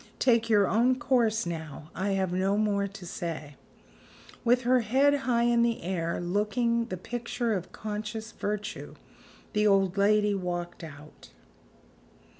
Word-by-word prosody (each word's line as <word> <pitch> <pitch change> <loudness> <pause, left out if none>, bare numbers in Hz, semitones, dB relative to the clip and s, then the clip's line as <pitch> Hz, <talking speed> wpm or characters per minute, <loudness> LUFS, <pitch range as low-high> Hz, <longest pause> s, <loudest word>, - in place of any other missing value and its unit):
Take 230 -2 +3
your 205 -3 +4
own 240 +6 +3
course 230 -6 +1
now; 160 -2 -6
I 195 +1 -1
have 190 -2 0
no 190 +2 +1
more 205 -2 +1
to 195 -2 -11
say." 165 -4 -5 0.9
With 245 +1 +3
her 255 +1 +4
head 265 +6 +3 0.2
high 235 -1 +3
in 235 0 +3
the 235 -4 0
air 170 -2 -2
looking 215 +6 0
the 185 - -4
picture 240 +3 -3
of 185 -2 -4
conscious 215 +1 -5
virtue 210 0 -5 0.6
the 210 -1 +3
old 195 -1 +3
lady 210 +1 +3
walked 175 -2 -4
out. 150 -1 -12
210 Hz, 140 wpm, -28 LUFS, 180-235 Hz, 0.9 s, your